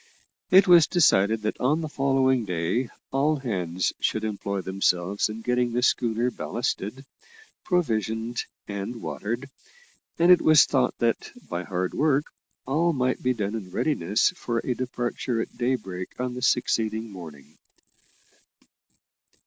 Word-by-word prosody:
It 190 +1 +6
was 175 -3 +7
decided 110 - +3
that 110 - -2
on 150 +6 +1
the 160 - -3
following 135 -3 +2
day 90 +6 -1 0.2
all 145 +3 +2
hands 95 - -2
should 110 - 0
employ 100 -2 -3
themselves 95 +1 0
in 110 +1 -6
getting 125 0 0
the 125 +1 0
schooner 120 0 +1
ballasted, 120 +2 -4 0.6
provisioned 115 - -1 0.2
and 100 +3 -5
watered, 120 +6 -4 0.7
and 170 +2 +5
it 180 - +7
was 155 -2 +6
thought 130 -3 0
that, 115 -1 0 0.2
by 85 +1 -4
hard 90 -1 -2
work, 145 0 +2 0.4
all 165 +6 +1
might 130 -2 0
be 125 0 +1
done 105 -2 -2
in 105 -5 -5
readiness 105 - +1
for 120 -10 -4
a 125 - 0
departure 120 -1 -3
at - - -4
daybreak 110 -8 -3
on 125 0 -2
the 125 - -6
succeeding 115 -3 0
morning. 75 -6 -12
120 Hz, 135 wpm, -25 LUFS, 100-135 Hz, 0.7 s, was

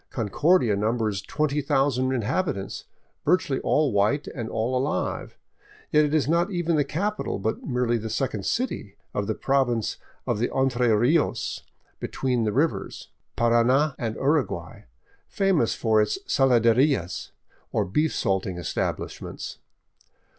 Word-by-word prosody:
Concordia 120 - +2
numbers 105 -1 0
twenty 150 -1 -1
thousand 135 -2 +1
inhabitants, 130 - -2 0.4
virtually 180 -4 +2
all 150 -3 +2
white 105 +9 +2
and 115 -4 -5
all 115 +3 -1
alive. 135 +4 -2 0.5
Yet 150 0 +5
it 145 - -2
is 150 -4 +2
not 170 +4 +2
even 175 -3 0
the 150 - +3
capital, 195 +9 -2
but 110 +3 -2
merely 125 -3 0
the 110 +1 -5
second 110 -4 -2
city 230 - -2 0.2
of 100 -1 -2
the 110 - -1
Province 125 -5 0 0.3
of - - -1
the 120 - +1
Entre 125 -2 +1
Rios 145 +9 +1
— - - -43
'* - - -40
Between 125 -4 0
the 105 - +1
Rivers 145 +9 -1
" - - -52
Parana 120 +5 +3
and 115 -2 -2
Uruguay, 135 - -1 0.4
famous 190 - +1
for 110 -2 +3
its 105 - 0
saladerias, 125 - +2 0.4
or - - +1
beef 150 - 0
salting 95 -2 -1
establishments. 85 -3 -4
125 Hz, 140 wpm, -25 LUFS, 110-150 Hz, 0.5 s, Yet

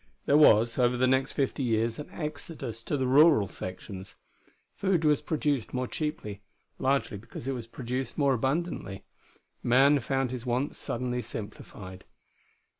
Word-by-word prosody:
There 140 - +3
was, 115 -5 +5
over 125 0 +3
the 130 - +3
next 130 +1 +2
fifty 140 0 -1
years, 115 -1 0
an 150 - -7
exodus 150 -7 -6
to 145 - -1
the 130 - 0
rural 140 -4 +6
sections. 95 +2 -8 0.6
Food 185 -5 +1
was 150 -2 +3
produced 145 -6 -1
more 125 0 -1
cheaply, 150 - -4 0.4
largely 130 -6 0
because 115 +3 -9
it - - 0
was 120 -3 -6
produced 125 +1 -4
more 140 -2 +3
abundantly. 130 - -2 0.6
Man 135 +4 +5
found 135 +1 -1
his 125 -2 -5
wants 125 +4 -1
suddenly 125 0 -2
simplified. 100 -4 -8
130 Hz, 145 wpm, -28 LUFS, 115-145 Hz, 0.6 s, rural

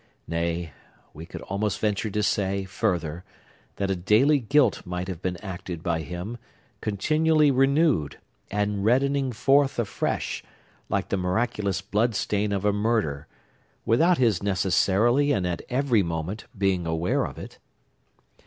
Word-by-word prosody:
Nay, 85 -1 -2 0.4
we 80 +3 -9
could - - -8
almost 100 +1 -2
venture 105 0 0
to 105 +1 -1
say, 100 -1 0
further, 90 -4 -2 0.5
that 100 -1 -1
a - - +1
daily 110 +11 +3
guilt 135 +4 +2
might 90 0 -4
have 90 -3 -6
been 90 -2 -2
acted 90 -3 -6
by 85 -3 0
him, 90 +9 -6 0.4
continually 155 +8 +2
renewed, 135 - +2 0.3
and 105 -1 -1
reddening 135 +4 +2
forth 135 +4 +3
afresh, 115 -4 -2 0.5
like 100 -1 -1
the 100 - 0
miraculous 100 +1 -1
blood 105 +3 0
stain 105 0 0
of 100 0 -1
a 105 - +3
murder, 105 -9 0 0.6
without 165 - +4
his 115 -8 +2
necessarily 100 +7 +2
and 95 -7 +1
at 90 -1 -2
every 125 -4 +2
moment 85 +4 -4
being 95 -3 +1
aware 80 +2 0
of - - -6
it. - - -10
100 Hz, 140 wpm, -25 LUFS, 90-120 Hz, 0.6 s, without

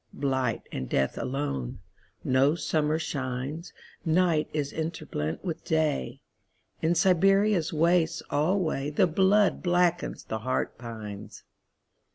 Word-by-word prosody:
Blight 130 -4 -1
and 65 - -4
death 65 0 +1
alone.No 130 - -2
summer 155 -1 0
shines. 135 +2 -4 0.3
Night 165 -2 +2
is 145 -2 -2
interblent 155 - -4
with 170 -3 -4
Day.In 160 - -3
Siberia's 195 0 +3
wastes 165 +1 +2
alwayThe 155 -1 +1
blood 200 +3 +3
blackens, 175 -1 +1
the 110 - -4
heart 125 +1 -2
pines. 110 -4 -8
155 Hz, 95 wpm, -27 LUFS, 130-175 Hz, 0.3 s, Siberia's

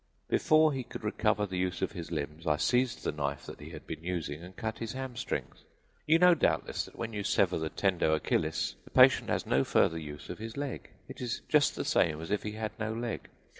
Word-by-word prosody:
Before 155 -1 +4
he 135 - -2
could - - -9
recover 105 -1 +1
the 95 -2 -3
use 90 -1 -1
of - - 0
his 85 -3 -7
limbs 75 +1 -4
I 75 -1 +3
seized 125 +9 +1
the - - 0
knife 70 -2 -3
that - - -9
he 75 +1 -9
had 80 -2 -10
been 80 - -7
using 85 -4 -3
and 90 +2 -11
cut 110 +2 -4
his 115 -1 -4
hamstrings. 130 -1 -4 0.4
You 160 +2 +6
know, 180 +1 +7
doubtless, 165 - 0
that - - -15
when 115 -1 -4
you 105 -1 -3
sever 95 -3 +2
the 80 0 -2
tendo 90 -5 +2
Achillis - - 0
the - - -15
patient - - +6
has - - 0
no 70 +1 +3
further 80 +4 +2
use 75 -2 -8
of - - -8
his 115 +2 -7
leg; 140 -2 -4 0.2
it - - -9
is 120 -2 -2
just 150 -2 +4
the - - -3
same 80 -2 +2
as 80 +4 -6
if 105 - +1
he 105 - -4
had 110 0 -3
no 110 0 -1
leg. 115 +1 -4
100 Hz, 230 wpm, -31 LUFS, 80-120 Hz, 0.4 s, know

